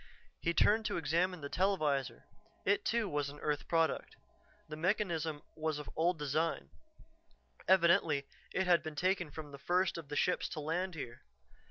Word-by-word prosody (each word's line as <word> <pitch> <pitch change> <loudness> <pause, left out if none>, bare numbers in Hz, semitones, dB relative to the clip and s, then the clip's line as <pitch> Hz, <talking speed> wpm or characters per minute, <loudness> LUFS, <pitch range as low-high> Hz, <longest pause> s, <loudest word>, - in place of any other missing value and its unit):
He 170 - 0
turned 220 +2 +4
to - - -1
examine 170 +3 0
the 140 - -4
televisor. 155 -7 0 0.4
It, 200 +1 +2
too, 230 -2 +1
was 145 -4 -1
an 145 - -10
earth 150 -2 -2
product. 165 -1 +1 0.5
The 155 - -6
mechanism 165 -3 -1
was 155 -1 -1
of 150 - -7
old 170 +2 +2
design; 155 +3 -1 1.0
evidently 170 -6 +4 0.3
it 190 - 0
had 175 -1 +5
been 155 -2 -6
taken 180 +1 +1
from 150 0 -8
the 140 - -10
first 180 +3 +1
of 150 -4 -10
the 145 - -4
ships 180 - +1
to 155 - -5
land 170 +4 -2
here. 120 -6 -7
165 Hz, 165 wpm, -34 LUFS, 150-180 Hz, 1.0 s, had